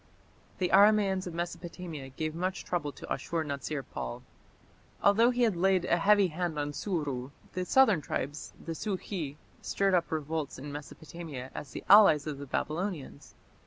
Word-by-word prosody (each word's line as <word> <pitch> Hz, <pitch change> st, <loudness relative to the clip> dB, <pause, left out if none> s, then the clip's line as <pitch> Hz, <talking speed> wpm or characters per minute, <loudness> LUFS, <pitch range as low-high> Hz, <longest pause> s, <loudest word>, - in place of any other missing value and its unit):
The 180 Hz, -2 st, 0 dB
Aramaeans 200 Hz, -2 st, +5 dB
of 170 Hz, -, -6 dB
Mesopotamia 170 Hz, -4 st, -5 dB
gave 155 Hz, +4 st, -3 dB
much 185 Hz, +3 st, -3 dB
trouble 165 Hz, -5 st, -2 dB
to -, -, -5 dB
Ashur 165 Hz, -1 st, -2 dB
natsir 140 Hz, -1 st, -4 dB
pal. -, -, -5 dB, 0.8 s
Although 225 Hz, +4 st, +6 dB
he 250 Hz, 0 st, +1 dB
had 220 Hz, -5 st, +3 dB
laid 185 Hz, 0 st, +2 dB
a 175 Hz, -, +3 dB
heavy 200 Hz, +1 st, +4 dB
hand 170 Hz, -1 st, -3 dB
on 145 Hz, 0 st, -2 dB
Suru, 145 Hz, -9 st, -2 dB, 0.2 s
the 185 Hz, 0 st, -2 dB
southern 220 Hz, -8 st, +5 dB
tribes, 145 Hz, +1 st, -4 dB
the 165 Hz, -, -4 dB
Sukhi, 185 Hz, -5 st, -4 dB, 0.3 s
stirred 195 Hz, -1 st, +1 dB
up 175 Hz, -2 st, +2 dB
revolts 155 Hz, -1 st, -2 dB
in 145 Hz, +2 st, -7 dB
Mesopotamia 145 Hz, -2 st, -8 dB
as 145 Hz, -, -7 dB
the -, -, -7 dB
allies 195 Hz, -8 st, +7 dB
of 150 Hz, -3 st, -4 dB
the 140 Hz, -, -7 dB
Babylonians. 155 Hz, -1 st, -4 dB
170 Hz, 160 wpm, -30 LUFS, 145-190 Hz, 0.8 s, allies